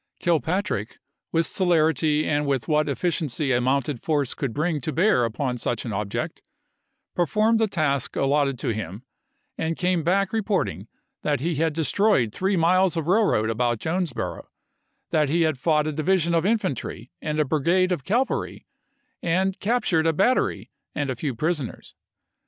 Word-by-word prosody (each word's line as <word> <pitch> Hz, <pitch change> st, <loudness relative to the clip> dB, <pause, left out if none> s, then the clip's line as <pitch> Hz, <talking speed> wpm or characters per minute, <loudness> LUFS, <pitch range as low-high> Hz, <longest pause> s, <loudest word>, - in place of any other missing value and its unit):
Kilpatrick, 165 Hz, -, -1 dB, 0.3 s
with 165 Hz, 0 st, +2 dB
celer 165 Hz, -3 st, +2 dB
ity 155 Hz, -1 st, 0 dB
and 145 Hz, -1 st, 0 dB
with 135 Hz, -5 st, -1 dB
what 150 Hz, -1 st, +2 dB
efficiency 150 Hz, -2 st, -1 dB
a 125 Hz, -1 st, +2 dB
mounted 130 Hz, 0 st, 0 dB
force 145 Hz, -5 st, 0 dB
could 135 Hz, -4 st, -3 dB
bring 155 Hz, +3 st, -1 dB
to 155 Hz, -, -2 dB
bear 165 Hz, -, +3 dB
upon 125 Hz, +2 st, -2 dB
such 120 Hz, +1 st, -2 dB
an 115 Hz, -, -4 dB
object, 100 Hz, 0 st, -3 dB, 0.7 s
per 175 Hz, -1 st, +1 dB
formed 220 Hz, +8 st, +2 dB
the 220 Hz, -, +3 dB
task 145 Hz, -, -1 dB
allotted 140 Hz, -1 st, +1 dB
to -, -, -2 dB
him, 105 Hz, 0 st, -4 dB, 0.6 s
and 160 Hz, 0 st, -1 dB
came 180 Hz, -1 st, +1 dB
back 190 Hz, +5 st, +1 dB
reporting 185 Hz, -, -1 dB, 0.3 s
that 145 Hz, -3 st, 0 dB
he 165 Hz, +6 st, -1 dB
had 160 Hz, 0 st, +1 dB
destroyed 160 Hz, -, +2 dB
three 190 Hz, +1 st, 0 dB
miles 180 Hz, +1 st, +3 dB
of 160 Hz, -, -1 dB
railroad 175 Hz, -, +2 dB
about 120 Hz, +1 st, 0 dB
Jonesboro; 160 Hz, 0 st, -3 dB, 0.6 s
that 150 Hz, -3 st, +2 dB
he 165 Hz, +3 st, +2 dB
had 155 Hz, -5 st, 0 dB
fought 150 Hz, +1 st, +2 dB
a 155 Hz, -, -1 dB
division 170 Hz, +3 st, +1 dB
of 170 Hz, +2 st, +2 dB
infantry 140 Hz, -, -2 dB
and 150 Hz, 0 st, -2 dB
a 150 Hz, -, +3 dB
brigade 170 Hz, +6 st, +2 dB
of 175 Hz, -7 st, -1 dB
cavalry, 240 Hz, -, -1 dB, 0.6 s
had 185 Hz, +3 st, 0 dB
captured 195 Hz, -8 st, +1 dB
a 165 Hz, -, +3 dB
battery 220 Hz, +10 st, +1 dB, 0.2 s
and 145 Hz, -2 st, -1 dB
a -, -, -3 dB
few 130 Hz, +1 st, -3 dB
prisoners. 150 Hz, -1 st, -3 dB
155 Hz, 165 wpm, -24 LUFS, 135-180 Hz, 0.7 s, bear